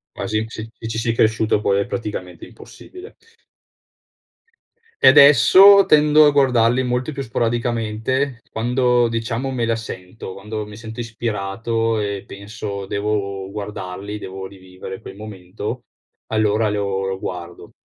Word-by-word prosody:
Quasi 110 Hz, 0 st, -2 dB
sì. 110 Hz, 0 st, -8 dB
Ci 115 Hz, -, -7 dB
ci 110 Hz, -, -4 dB
si 115 Hz, 0 st, 0 dB
cresciuto 110 Hz, -1 st, +2 dB
poi 100 Hz, -1 st, +1 dB
è 100 Hz, -, 0 dB
praticamente 100 Hz, -7 st, -6 dB
impossibile. 370 Hz, +5 st, -13 dB, 1.9 s
E -, -, +8 dB
adesso 185 Hz, +8 st, +8 dB
tendo 150 Hz, 0 st, +5 dB
a 145 Hz, -, +5 dB
guardarli 125 Hz, -3 st, +3 dB
molto 125 Hz, +3 st, -2 dB
più 140 Hz, -1 st, -5 dB
sporadicamente, 120 Hz, +1 st, -1 dB
quando 125 Hz, +1 st, +1 dB
diciamo 115 Hz, +3 st, -3 dB
me 120 Hz, -3 st, -1 dB
la 115 Hz, -, +1 dB
sento, 95 Hz, -3 st, -8 dB
quando 105 Hz, +2 st, -6 dB
mi 105 Hz, 0 st, -11 dB
sento 115 Hz, +2 st, -8 dB
ispirato 115 Hz, 0 st, -2 dB
e 100 Hz, -2 st, -3 dB
penso: 100 Hz, -1 st, -7 dB
"Devo 100 Hz, -1 st, -2 dB
guardarli, 100 Hz, -1 st, -6 dB
devo 95 Hz, -1 st, -7 dB
rivivere 95 Hz, 0 st, -10 dB
quel 95 Hz, -, -11 dB
momento", 105 Hz, +3 st, -7 dB, 0.5 s
allora 110 Hz, 0 st, +1 dB
lo 100 Hz, -2 st, -2 dB
lo 95 Hz, 0 st, -3 dB
guardo. 90 Hz, -2 st, -8 dB
110 Hz, 130 wpm, -20 LUFS, 100-120 Hz, 1.9 s, E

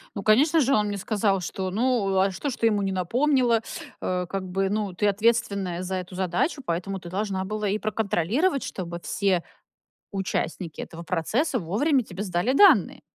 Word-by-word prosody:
Ну, 200 Hz, -, -4 dB
конечно 295 Hz, +9 st, +4 dB
же, 275 Hz, 0 st, +2 dB
он 210 Hz, -3 st, +3 dB
мне 205 Hz, 0 st, -3 dB
сказал, 200 Hz, -1 st, 0 dB
что 185 Hz, +2 st, -3 dB
ну, 215 Hz, -3 st, +1 dB
а 195 Hz, +1 st, +3 dB
что 285 Hz, +10 st, -3 dB
ж 255 Hz, -, -4 dB
ты 230 Hz, -, +2 dB
ему 210 Hz, -2 st, +1 dB
не 195 Hz, -1 st, -1 dB
напомнила? 240 Hz, -, +2 dB, 0.4 s
Э, 180 Hz, 0 st, -1 dB
как 195 Hz, -1 st, -3 dB
бы 195 Hz, +1 st, 0 dB
ну 205 Hz, -2 st, -1 dB
ты 205 Hz, +4 st, +1 dB
ответственная 200 Hz, -4 st, +1 dB
за 190 Hz, +1 st, -3 dB
эту 185 Hz, 0 st, -5 dB
задачу, 185 Hz, -, -1 dB
поэтому 190 Hz, +2 st, -2 dB
ты 175 Hz, -, -9 dB
должна 195 Hz, 0 st, -2 dB
была 210 Hz, +2 st, -3 dB
и 200 Hz, +2 st, +1 dB
проконтролировать, 215 Hz, -, 0 dB
чтобы 170 Hz, -2 st, -5 dB
все 190 Hz, -4 st, 0 dB, 0.7 s
участники 185 Hz, -4 st, -3 dB
этого 165 Hz, -, -8 dB
процесса, 185 Hz, -, 0 dB
вовремя 245 Hz, -, +1 dB
тебе 185 Hz, -2 st, -8 dB
сдали 185 Hz, +5 st, 0 dB
данные. 400 Hz, +8 st, +5 dB
200 Hz, 180 wpm, -25 LUFS, 185-230 Hz, 0.7 s, данные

